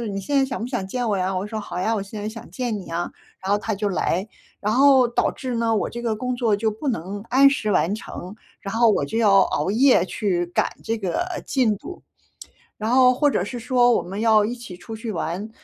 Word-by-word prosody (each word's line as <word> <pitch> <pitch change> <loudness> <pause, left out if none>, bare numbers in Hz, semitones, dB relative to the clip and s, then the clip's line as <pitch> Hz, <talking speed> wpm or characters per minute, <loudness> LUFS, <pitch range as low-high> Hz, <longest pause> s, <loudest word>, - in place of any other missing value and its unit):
说： 235 - -3
“你 195 - -3
现 280 +9 -1
在 270 - +4
想 265 -1 -4
不 230 - -3
想 245 -7 -3
见 245 +4 -2
我 205 - +1
呀？ 185 0 -1
“我 185 +1 -2
就 - - -7
说：” 220 - -4
好 180 -3 -5
呀， 220 +5 +1
我 210 - -2
现 205 +2 -8
在 210 - -3
想 225 +1 -10
见 245 -4 -2
你 195 - -7
呀， 170 +1 -3 0.3
“然 190 - -4
后 205 - +4
他 215 +1 -2
就 205 +1 -1
来， 190 +1 -1 0.3
然 210 +1 0
后 265 -1 +6
导 240 - +1
致 255 -2 -5
呢， 230 -1 +1
我 - - 0
这 235 - -7
个 230 -2 0
工 250 +2 -3
作 235 -4 +2
就 220 +2 0
不 220 +8 -5
能 200 -2 -3
按 275 +2 +7
时 275 -6 -1
完 185 +1 +2
成， 190 -3 -8 0.3
然 195 0 -6
后 230 0 +5
我 210 - +1
就 225 - -5
要 205 -4 +5
熬 185 - -1
夜 245 -3 +4
去 185 -2 -1
赶 175 - 0 0.2
这 225 0 -1
个 195 - -1 0.2
进 245 -6 +2
度， 360 - -10 0.8
然 215 +1 -3
后 255 0 +6
或 290 +3 +2
者 180 - 0
是 240 +5 -5
说 245 0 +3
我 - - +1
们 195 +4 -5
要 220 -2 +4
一 235 +3 -3
起 235 -7 -10
出 200 +5 -8
去 225 0 -5
玩。 180 +3 -3
220 Hz, 270 characters per minute, -23 LUFS, 195-245 Hz, 0.8 s, 按